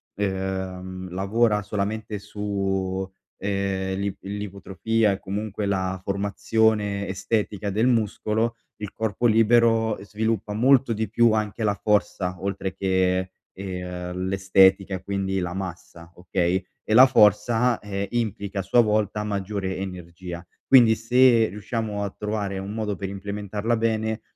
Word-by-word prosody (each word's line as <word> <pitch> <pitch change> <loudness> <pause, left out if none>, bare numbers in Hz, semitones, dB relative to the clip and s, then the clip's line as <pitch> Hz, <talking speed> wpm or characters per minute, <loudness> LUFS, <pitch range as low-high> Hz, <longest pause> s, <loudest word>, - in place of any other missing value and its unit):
ehm, 95 -2 -4
lavora 105 +3 +1
solamente 105 +1 -3
su, 95 -2 -2 0.3
ehm, 95 -1 -2
l'ip 100 0 -3
l'ipotrofia 100 +2 -1
e 95 - -5
comunque 105 +1 -4
la 95 -1 -1
formazione 100 +1 0
estetica 100 +1 -2
del 110 +5 +1
muscolo, 115 0 0 0.2
il 105 -2 -6
corpo 110 +1 -2
libero 115 -1 +4
sviluppa 110 0 -2
molto 125 +2 +4
di 110 -1 -2
più 115 +1 +4
anche 110 +1 -1
la 105 -1 +2
forza 105 -3 0
oltre 95 -1 -3
che, 95 -1 +1 0.2
ehm, 90 -1 -5
l'estetica 95 0 +3
e 90 - -7
quindi 95 -1 -2
la 90 -1 -3
massa, 85 -2 -7
okay, 90 +1 -1 0.2
e - - -1
la 130 +4 +9
forza, 115 +1 +3
ehm, 100 -1 -4
implica 105 -4 -2
a - - +1
sua 95 +6 +4
volta 105 -1 0
maggiore 100 -2 -3
energia 90 -2 -7 0.2
quindi 120 -4 +7
se 120 0 +4
riusciamo 105 +1 -4
a 100 - -2
trovare 105 -2 -3
un 100 +2 -6
modo 105 -2 -2
per 95 +1 -5
implementarla 105 +3 -3
bene 110 0 -1
100 Hz, 130 wpm, -24 LUFS, 95-110 Hz, 0.3 s, la